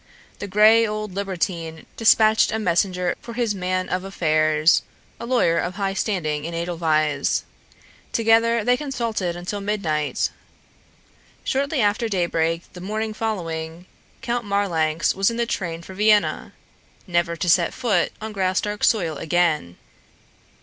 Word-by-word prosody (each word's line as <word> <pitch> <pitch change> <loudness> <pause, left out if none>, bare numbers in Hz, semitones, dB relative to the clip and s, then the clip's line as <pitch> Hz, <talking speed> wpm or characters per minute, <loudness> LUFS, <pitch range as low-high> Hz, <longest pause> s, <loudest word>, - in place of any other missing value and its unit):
The 205 - -5
gray 215 +3 +5
old 215 -2 -4
libertine 175 -4 -3
despatched 220 -1 +4
a 220 - -1
messenger 180 -2 +1
for 235 - -8
his 235 -3 0
man 185 -1 -2
of 185 0 -2
affairs, 155 -4 +2 0.4
a 235 - -6
lawyer 235 -10 +2
of 175 +1 -3
high 195 -1 -1
standing 155 -8 -1
in 165 +1 -5
Edelweiss. 165 -3 0 0.7
Together 230 0 +3
they 245 +3 +3
consulted 230 - -3
until 180 +4 -5
midnight. 170 -8 -1 1.1
Shortly 280 +1 0
after 215 +3 +1
daybreak 165 -3 0
the 180 - -10
morning 215 +3 -3
following. 170 -6 -4 0.4
Count 240 -1 -1
Marlanx 170 -6 0
was 195 +2 +2
in 230 - -4
the 235 - +1
train 170 -7 -4
for 190 - -10
Vienna, 210 +1 +2 0.5
never 170 -2 0
to 175 - -3
set 170 0 +4
foot 205 -8 0
on 220 0 -6
Graustark's 195 +2 0
soil 170 -9 +1
again. 155 - 0
190 Hz, 135 wpm, -22 LUFS, 170-215 Hz, 1.1 s, gray